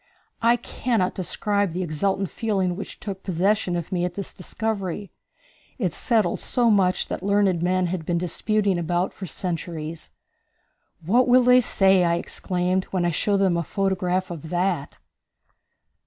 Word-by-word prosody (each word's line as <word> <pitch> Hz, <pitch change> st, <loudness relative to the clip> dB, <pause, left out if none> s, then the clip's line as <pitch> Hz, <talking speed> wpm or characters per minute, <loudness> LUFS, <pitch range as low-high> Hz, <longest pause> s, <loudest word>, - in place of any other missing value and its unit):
I 235 Hz, +1 st, +5 dB
cannot 230 Hz, -4 st, -1 dB
describe 200 Hz, 0 st, -1 dB
the 185 Hz, +2 st, -2 dB
exultant 190 Hz, +4 st, -1 dB
feeling 195 Hz, -6 st, -1 dB
which 200 Hz, -, -8 dB
took 195 Hz, -2 st, -6 dB
possession 190 Hz, +1 st, 0 dB
of 170 Hz, -2 st, -4 dB
me 175 Hz, -2 st, 0 dB
at 175 Hz, 0 st, -2 dB
this 200 Hz, -, -6 dB
discovery. 200 Hz, -1 st, -4 dB, 0.7 s
It 185 Hz, -, -1 dB
settled 225 Hz, +1 st, +1 dB
so 240 Hz, -2 st, +2 dB
much 190 Hz, -3 st, +2 dB
that -, -, -4 dB
learned 200 Hz, -3 st, +2 dB
men 185 Hz, +1 st, +1 dB
had 175 Hz, -1 st, -3 dB
been 170 Hz, +2 st, -1 dB
disputing 195 Hz, +2 st, 0 dB
about 175 Hz, +2 st, -1 dB
for 190 Hz, -, -7 dB
centuries. 165 Hz, -3 st, -5 dB, 1.0 s
"What 240 Hz, +8 st, +3 dB
will 250 Hz, +1 st, +6 dB
they 250 Hz, +1 st, +6 dB
say," 190 Hz, -5 st, +4 dB
I 170 Hz, -1 st, +2 dB
exclaimed, 180 Hz, +2 st, -1 dB
"when 185 Hz, -2 st, -1 dB
I 175 Hz, -, +2 dB
show 200 Hz, +5 st, +1 dB
them 190 Hz, -3 st, +2 dB
a -, -, +1 dB
photograph 185 Hz, 0 st, -1 dB
of 160 Hz, -2 st, -7 dB
that?" 175 Hz, -4 st, -1 dB
185 Hz, 155 wpm, -24 LUFS, 175-205 Hz, 1.0 s, will